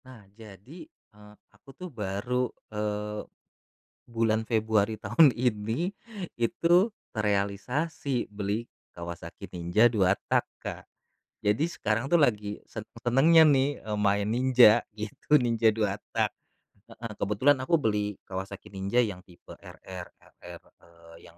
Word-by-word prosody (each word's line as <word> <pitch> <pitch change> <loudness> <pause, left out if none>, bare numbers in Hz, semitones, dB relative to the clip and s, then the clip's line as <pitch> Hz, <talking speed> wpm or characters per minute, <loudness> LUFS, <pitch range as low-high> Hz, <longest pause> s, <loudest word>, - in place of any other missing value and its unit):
Nah, 125 -5 -14
jadi, 110 - -13
eee, 105 - -19 0.2
aku 140 - -21
tuh 180 0 -7
baru, 115 +4 -2 0.2
eee, 105 0 -3 0.8
bulan 115 -1 0
Februari 110 -1 +1
tahun 120 +8 +5
ini, 120 - -1 0.4
itu 175 - +2 0.2
terealisasi 110 +7 -1
beli 105 +3 -3 0.2
Kawasaki 85 0 -8
Ninja 90 +7 +4
2 100 -6 +2 0.2
tak, - - +3 0.2
Kak. - - -6 0.6
Jadi, 105 +8 +2
sekarang 115 -7 -2
tuh 165 +2 +3
lagi 105 -5 0
seneng-senengnya 125 +9 +3
nih, 135 0 +3
eee, 105 -1 -3
main 100 0 +1
Ninja, 120 -2 +5
gitu, 105 +7 -2
Ninja 115 -2 +2
2 105 -2 -1 0.2
tak. - - +2 0.6
Heeh, 115 0 -8
kebetulan 105 +10 +2
aku 165 +4 +2
beli 105 -5 -1
Kawasaki 95 +1 -6
Ninja 100 +4 -1
yang 105 -7 -1
tipe 90 -2 -15
RR, 90 -2 -10
RR, - - -13 0.2
eee, 85 -1 -18 0.2
yang 85 - -26
110 Hz, 125 wpm, -28 LUFS, 100-125 Hz, 0.8 s, tahun